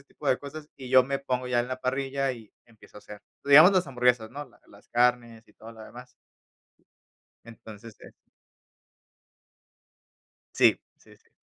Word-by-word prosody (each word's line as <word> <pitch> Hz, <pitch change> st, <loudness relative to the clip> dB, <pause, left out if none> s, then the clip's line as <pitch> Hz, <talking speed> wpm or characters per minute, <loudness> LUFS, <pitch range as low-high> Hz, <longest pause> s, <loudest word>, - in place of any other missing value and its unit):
ese -, -, -22 dB
tipo 145 Hz, -, -13 dB
de 130 Hz, -, +2 dB
cosas, 150 Hz, +1 st, -11 dB
y 130 Hz, -2 st, -11 dB
yo 130 Hz, 0 st, +5 dB
me 140 Hz, +1 st, -3 dB
pongo 130 Hz, -2 st, -4 dB
ya 120 Hz, -1 st, +1 dB
en 120 Hz, -, -5 dB
la 130 Hz, 0 st, -6 dB
parrilla 135 Hz, +1 st, -2 dB
y 115 Hz, -4 st, -13 dB
empiezo 115 Hz, -3 st, -20 dB
a -, -, -11 dB
hacer. 105 Hz, 0 st, -13 dB, 0.2 s
Digamos 150 Hz, +7 st, +7 dB
las 185 Hz, -5 st, +1 dB
hamburguesas, 125 Hz, -3 st, 0 dB
¿no?, 145 Hz, +3 st, -8 dB
la -, -, -25 dB
las 100 Hz, -, -20 dB
carnes 120 Hz, -2 st, -1 dB
y -, -, -23 dB
todo 115 Hz, +1 st, -14 dB
lo 110 Hz, -1 st, -14 dB
demás. 125 Hz, +3 st, -14 dB, 1.3 s
Entonces, 110 Hz, -1 st, -13 dB
eh -, -, -13 dB, 2.5 s
Sí, -, -, +4 dB, 0.2 s
sí, -, -, -21 dB
sí. -, -, -35 dB
125 Hz, 170 wpm, -26 LUFS, 115-135 Hz, 2.5 s, Digamos